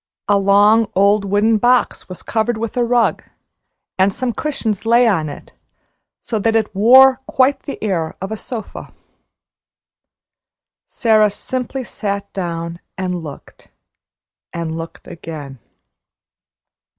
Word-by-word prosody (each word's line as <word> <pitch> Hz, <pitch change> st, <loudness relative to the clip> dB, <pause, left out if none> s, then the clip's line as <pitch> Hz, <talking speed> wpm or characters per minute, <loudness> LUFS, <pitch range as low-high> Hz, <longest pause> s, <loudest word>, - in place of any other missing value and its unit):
A 205 Hz, -, +3 dB
long, 205 Hz, +2 st, +4 dB
old 200 Hz, +2 st, +3 dB
wooden 210 Hz, +3 st, +2 dB
box 245 Hz, -2 st, +1 dB
was 185 Hz, -, -9 dB
covered 225 Hz, +1 st, -1 dB
with 230 Hz, 0 st, -4 dB
a 245 Hz, -, +1 dB
rug, 240 Hz, 0 st, +1 dB, 0.8 s
and 190 Hz, +1 st, +4 dB
some 245 Hz, +3 st, -3 dB
cushions 230 Hz, -10 st, -3 dB
lay 235 Hz, +2 st, +4 dB
on 165 Hz, -8 st, +1 dB
it, 145 Hz, -, -11 dB, 0.7 s
so 220 Hz, -, -2 dB
that 225 Hz, +2 st, +1 dB
it 220 Hz, -2 st, 0 dB
wore 260 Hz, +6 st, +6 dB
quite 265 Hz, +2 st, +2 dB
the 280 Hz, -, -5 dB
air 170 Hz, -6 st, -2 dB
of 195 Hz, +3 st, -6 dB
a -, -, -2 dB
sofa. 220 Hz, 0 st, -8 dB, 1.9 s
Sara 215 Hz, -3 st, +3 dB
simply 255 Hz, +5 st, -4 dB
sat 200 Hz, -4 st, -5 dB
down, 170 Hz, -2 st, -4 dB, 0.2 s
and 180 Hz, -2 st, -3 dB
looked, 150 Hz, -3 st, -12 dB, 0.8 s
and 165 Hz, -1 st, -4 dB
looked 165 Hz, 0 st, -8 dB
again. 155 Hz, -6 st, -9 dB
210 Hz, 125 wpm, -18 LUFS, 185-235 Hz, 1.9 s, wore